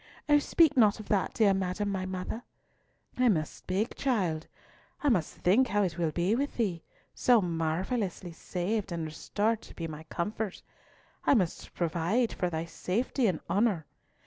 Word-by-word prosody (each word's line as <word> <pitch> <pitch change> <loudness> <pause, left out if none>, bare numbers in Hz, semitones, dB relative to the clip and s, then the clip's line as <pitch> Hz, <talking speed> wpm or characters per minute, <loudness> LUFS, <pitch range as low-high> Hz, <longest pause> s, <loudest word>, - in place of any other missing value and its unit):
"Oh 295 0 +6
speak 310 +1 +4
not 220 -4 +5
of 215 - -9
that, 200 -3 +1
dear 210 -3 +4
madam, 190 +2 -1
my 185 -1 -2
mother." 185 +5 -4 0.8
"I 250 -1 +5
must 155 -7 +1
speak, 195 +5 -2
child. 185 - 0 0.6
I 290 - +4
must 185 - +1
think 225 +9 +3
how 205 0 +2
it 175 -3 -2
will 165 -2 +2
be 175 +6 +1
with 280 +5 -1
thee, 190 -8 0 0.3
so 245 -2 +4
marvellously 180 +3 -2
saved, 185 +4 -3
and 170 -2 -2
restored 210 +8 -1
to - - -14
be 165 - -4
my 155 -1 -7
comfort. 205 +4 -3 0.6
I - - +5
must 185 -8 -1
provide 175 +8 +1
for 180 - -1
thy 160 -1 -3
safety 225 - -1
and 180 -5 -1
honour. 200 -6 +1
190 Hz, 165 wpm, -30 LUFS, 170-225 Hz, 0.8 s, Oh